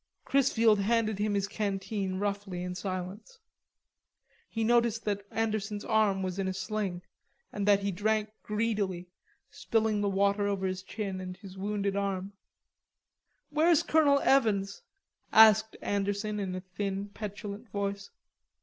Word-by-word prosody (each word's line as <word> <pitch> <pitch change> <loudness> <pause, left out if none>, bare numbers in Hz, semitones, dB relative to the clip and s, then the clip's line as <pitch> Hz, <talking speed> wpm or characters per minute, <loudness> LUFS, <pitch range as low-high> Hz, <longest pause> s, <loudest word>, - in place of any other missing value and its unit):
Chrisfield 230 -6 +3
handed 220 0 +1
him 210 0 0
his 200 0 0
canteen 200 -1 -2
roughly 200 -2 -3
in 180 0 -4
silence. 185 - -5 1.1
He 225 - -2
noticed 235 -1 +2
that 200 -1 -2
Anderson's 215 -2 -2
arm 210 -3 +2
was 185 +1 -3
in 190 - 0
a 190 - -2
sling, 190 -2 -3 0.5
and 205 -1 -2
that 200 -1 +5
he 200 0 -1
drank 215 +3 0
greedily, 205 -5 -2 0.4
spilling 220 -2 0
the 205 - +1
water 200 +1 +2
over 195 -1 -1
his 185 0 -2
chin 195 -1 -5
and 185 0 -7
his 195 -3 -11
wounded 200 0 -2
arm. 195 -1 -2 1.2
"Where's 315 +1 +4
Colonel 295 -3 +4
Evans?" 205 -7 +2 0.5
asked 220 0 +6
Anderson 205 +1 -1
in 190 -2 -3
a 185 - -4
thin 195 +1 -4
petulant 205 +2 -7
voice. 200 0 -3
200 Hz, 135 wpm, -30 LUFS, 195-215 Hz, 1.2 s, asked